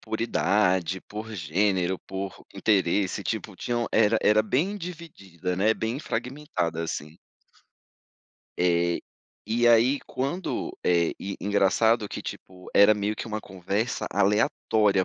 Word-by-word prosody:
por 110 Hz, -, -4 dB
idade, 95 Hz, -4 st, +1 dB
por 110 Hz, +2 st, -8 dB
gênero, 95 Hz, +1 st, 0 dB
por 95 Hz, 0 st, -7 dB
interesse, 100 Hz, -1 st, +1 dB
tipo 110 Hz, -2 st, -3 dB
tinham 120 Hz, +3 st, -2 dB
era 110 Hz, 0 st, +4 dB
era 105 Hz, +1 st, +5 dB
bem 155 Hz, -, 0 dB
dividida, 100 Hz, -, -6 dB
né, 105 Hz, +4 st, +3 dB
bem 115 Hz, +4 st, -2 dB
fragmentada, 120 Hz, -, -3 dB
assim. 80 Hz, -1 st, -5 dB, 1.4 s
Eh, 85 Hz, -1 st, +2 dB, 0.5 s
e 120 Hz, +2 st, +2 dB
aí 120 Hz, +4 st, +5 dB
quando 140 Hz, +8 st, -3 dB
eh, 85 Hz, -2 st, +3 dB, 0.3 s
engraçado 105 Hz, +2 st, +2 dB
que -, -, -5 dB
tipo, 90 Hz, -1 st, -9 dB
era 100 Hz, +1 st, +7 dB
meio 105 Hz, +1 st, -2 dB
que -, -, -5 dB
uma 110 Hz, -1 st, -3 dB
conversa 100 Hz, +5 st, -3 dB
aleatória, 100 Hz, 0 st, +2 dB
105 Hz, 120 wpm, -26 LUFS, 95-115 Hz, 1.4 s, era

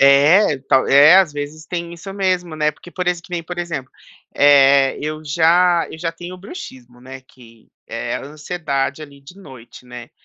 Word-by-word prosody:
É, 145 Hz, +4 st, +5 dB
tal 130 Hz, -, +3 dB
é 145 Hz, +6 st, +7 dB
às 190 Hz, -5 st, +3 dB
vezes 145 Hz, +2 st, -7 dB
tem 170 Hz, -1 st, -5 dB
isso 195 Hz, +3 st, -10 dB
mesmo 185 Hz, -4 st, -2 dB
né, 150 Hz, -1 st, 0 dB
porque 150 Hz, +4 st, -16 dB
por 180 Hz, 0 st, -5 dB
exem 175 Hz, -1 st, -2 dB
que 180 Hz, -, -18 dB
nem 175 Hz, -1 st, -4 dB
por 175 Hz, +2 st, -8 dB
exemplo, 155 Hz, -7 st, -5 dB, 0.4 s
eh, 140 Hz, -1 st, +4 dB
eu 155 Hz, +1 st, -5 dB
já 170 Hz, +3 st, +2 dB
eu -, -, -10 dB
já 165 Hz, 0 st, -3 dB
tenho 175 Hz, +1 st, -9 dB
o -, -, -13 dB
bruxismo, 130 Hz, -, -11 dB
né, 130 Hz, +1 st, -11 dB
que 115 Hz, -3 st, -20 dB, 0.2 s
é 115 Hz, +1 st, -5 dB
a -, -, -8 dB
ansiedade 150 Hz, -1 st, -4 dB
ali 140 Hz, -2 st, -13 dB
de 145 Hz, +7 st, -16 dB
noite, 130 Hz, -9 st, -14 dB
né. 125 Hz, -1 st, -11 dB
155 Hz, 195 wpm, -18 LUFS, 135-175 Hz, 0.4 s, é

